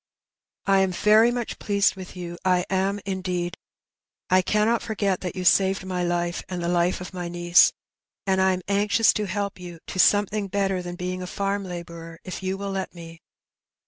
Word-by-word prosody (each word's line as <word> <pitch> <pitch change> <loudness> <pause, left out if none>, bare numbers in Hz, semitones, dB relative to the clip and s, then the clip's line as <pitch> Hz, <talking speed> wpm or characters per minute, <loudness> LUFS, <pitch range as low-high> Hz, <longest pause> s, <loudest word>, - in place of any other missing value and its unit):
I 195 0 +4
am 190 -1 +2
very 215 +5 +5
much 240 -1 -4
pleased 200 -1 +2
with 185 -1 -9
you; 175 -1 -6
I 180 -1 +2
am, 195 +2 0
indeed. 185 -2 -2 0.8
I 185 0 +6
cannot 215 +5 +1
forget 200 -4 -1
that 180 - -4
you 185 -1 -4
saved 190 +1 +3
my 180 -1 -2
life, 175 0 -1
and 180 -2 -4
the 170 - -1
Ufe 175 +1 +1
of 180 - -8
my 175 -1 -4
niece; 175 0 +5 0.5
and 190 -1 +2
I 190 0 +4
am 185 0 -4
anxious 210 +3 +3
to 210 - -1
help 200 +1 -3
you 175 -1 -9
to 185 - -6
something 205 +2 +3
better 195 -1 0
than 175 0 -6
being 180 +1 -4
a 180 - -5
farm 200 +2 -2
labourer 170 -2 -8
if 185 - -6
you 190 0 -2
will 200 0 -4
let 190 -1 -4
me. 165 -1 -11
185 Hz, 190 wpm, -24 LUFS, 175-200 Hz, 0.8 s, I